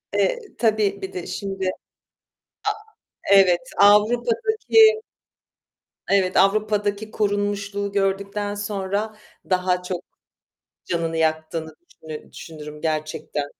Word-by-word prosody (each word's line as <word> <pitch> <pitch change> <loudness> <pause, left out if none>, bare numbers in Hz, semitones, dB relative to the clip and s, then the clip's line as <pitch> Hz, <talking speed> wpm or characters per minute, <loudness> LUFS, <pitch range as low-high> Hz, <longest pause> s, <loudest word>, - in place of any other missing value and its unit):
Eee, - - +2 0.2
tabii 215 -3 +1
bir 190 0 -6
de 180 - -5
şimdi, 195 -1 -4 1.7
a - - +8
evet, 185 -3 +6 0.2
Avrupa'daki 245 - +5 1.1
Evet, 190 -2 +2
Avrupa'daki 210 +1 +2
korunmuşluğu 205 -1 -1
gördükten 200 +1 -1
sonra 205 +1 -3 0.3
daha 180 -1 +1
çok 180 -1 -4 0.8
canını 165 -1 -2
yaktığını 160 0 -1 0.3
düşünü 155 -1 -8
düşünürüm 150 -2 -9
gerçekten. 155 -2 -2
200 Hz, 90 wpm, -23 LUFS, 180-210 Hz, 1.7 s, a